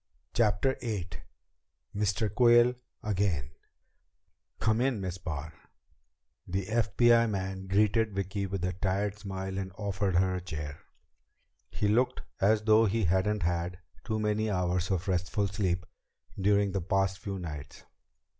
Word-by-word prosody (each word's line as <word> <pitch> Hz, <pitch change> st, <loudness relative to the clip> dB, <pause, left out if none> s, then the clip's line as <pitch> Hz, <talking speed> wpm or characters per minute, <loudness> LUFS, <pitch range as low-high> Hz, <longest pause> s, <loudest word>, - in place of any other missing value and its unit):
CHAPTER 115 Hz, +4 st, +2 dB
VIII 105 Hz, -7 st, -3 dB, 0.9 s
Mr. 105 Hz, 0 st, 0 dB
Quayle 120 Hz, +1 st, +6 dB, 0.3 s
Again 95 Hz, -, 0 dB, 1.1 s
"Come 110 Hz, +2 st, +2 dB
in, 130 Hz, -4 st, +1 dB
Miss 95 Hz, -1 st, -4 dB
Barr." 80 Hz, -2 st, -5 dB, 0.9 s
The 95 Hz, +1 st, -2 dB
FBI 115 Hz, +2 st, +3 dB
man 95 Hz, -1 st, -3 dB
greeted 105 Hz, +2 st, +2 dB
Vicki 100 Hz, +1 st, -2 dB
with 95 Hz, -2 st, -3 dB
a 90 Hz, -, -1 dB
tired 100 Hz, +3 st, -1 dB
smile 95 Hz, -1 st, -4 dB
and 95 Hz, -1 st, -4 dB
offered 100 Hz, -2 st, -1 dB
her 95 Hz, +1 st, +3 dB
a 90 Hz, -, -3 dB
chair. 75 Hz, -4 st, -6 dB, 0.9 s
He 105 Hz, -, -1 dB
looked 120 Hz, +5 st, +2 dB, 0.2 s
as 105 Hz, +2 st, +3 dB
though 110 Hz, +1 st, +5 dB
he 110 Hz, +2 st, 0 dB
hadn't 95 Hz, +3 st, +1 dB
had 85 Hz, +1 st, -1 dB, 0.3 s
too 110 Hz, -2 st, -2 dB
many 105 Hz, +1 st, 0 dB
hours 90 Hz, -2 st, 0 dB
of 95 Hz, -1 st, -1 dB
restful 95 Hz, +2 st, 0 dB
sleep 90 Hz, -3 st, -1 dB, 0.5 s
during 100 Hz, 0 st, +2 dB
the 95 Hz, 0 st, -1 dB
past 95 Hz, +2 st, 0 dB
few 100 Hz, -1 st, -4 dB
nights. 75 Hz, -5 st, -7 dB
100 Hz, 135 wpm, -30 LUFS, 90-105 Hz, 1.1 s, Quayle